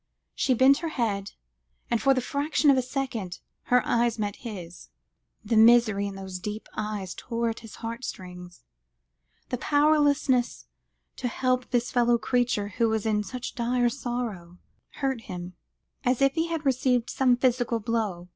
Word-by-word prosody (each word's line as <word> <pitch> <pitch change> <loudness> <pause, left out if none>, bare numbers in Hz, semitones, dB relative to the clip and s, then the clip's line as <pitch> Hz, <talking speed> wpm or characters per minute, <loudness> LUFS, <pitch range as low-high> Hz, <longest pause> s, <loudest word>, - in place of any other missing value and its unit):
She 260 - +1
bent 265 +3 +5
her 335 - -3
head, 210 -9 -2 0.6
and 235 - +1
for 270 -1 +4
the 255 - +1
fraction 285 +3 +2
of - - +4
a - - +3
second, 245 -8 -4 0.3
her 250 0 +3
eyes 235 -1 +1
met 205 -2 -3
his. 180 -7 -9 0.6
The 230 - 0
misery 220 -3 +5
in 200 - -6
those 190 -1 -6
deep 210 +3 -6
eyes 210 -4 -4
tore 235 0 -2
at 225 - -8
his 225 -2 -11
heart 230 +3 -5
strings; 180 - -8 0.8
his 250 - -3
powerlessness 290 -4 +2 0.5
to 255 - -2
help 255 +1 0
this 245 -1 0
fellow 240 -1 +3
creature 235 -3 0
who 225 +3 +1
was 220 -1 -1
in 215 -1 +1
such 250 +4 -6
dire 245 0 +1
sorrow, 235 -9 -5 0.4
hurt 265 -4 -2
him, 180 -1 -7 0.5
as 250 -2 +1
if 275 0 +3
he 330 0 0
had 325 -2 -3
received 255 -2 +1
some 255 -2 +3
physical 245 -2 +1
blow. 210 -6 -2
235 Hz, 160 wpm, -26 LUFS, 210-255 Hz, 0.8 s, bent